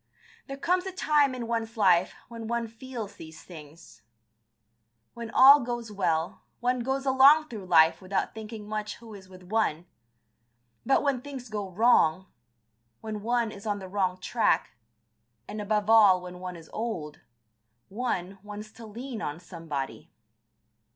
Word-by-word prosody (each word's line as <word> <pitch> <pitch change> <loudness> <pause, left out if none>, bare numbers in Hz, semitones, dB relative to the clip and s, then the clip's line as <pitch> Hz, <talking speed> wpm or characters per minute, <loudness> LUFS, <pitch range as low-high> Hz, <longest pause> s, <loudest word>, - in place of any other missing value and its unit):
There 275 -1 -6
comes 360 +5 0
a - - -3
time 295 -7 +2
in 245 -2 -5
one's 230 0 -3
life 185 -4 +3
when 230 -1 -8
one 235 0 -1
feels 230 -2 -8
these 160 -1 -11
things. 150 - -13 1.1
When 235 -1 -7
all 270 +5 +8
goes 240 -3 -4
well, 165 -5 -1 0.2
one 250 +1 0
goes 265 +3 -2
along 275 +4 +6
through 210 -5 -8
life 160 -1 +5
without 190 +1 -2
thinking 220 -1 -8
much 215 0 -4
who 230 -2 -13
is 190 -2 -12
with 185 -1 -14
one, 180 -4 -1 1.0
but 270 - +2
when 275 -4 0
things 265 -3 -8
go 205 -2 -4
wrong, 185 -4 +3 0.8
when 215 -1 -5
one 235 0 0
is 200 +1 -10
on 205 -1 0
the 190 -1 -8
wrong 185 -1 -1
track, 230 +4 +1 0.8
and 210 0 -5
above 210 0 0
all 210 -5 +6
when 180 0 -9
one 180 -1 -6
is 165 -1 -12
old, 175 -10 -4 0.7
one 195 -4 -3
wants 210 +1 -9
to 225 0 -12
lean 235 +2 -7
on 150 -2 -4
somebody. 160 - -6
215 Hz, 150 wpm, -27 LUFS, 185-240 Hz, 1.1 s, all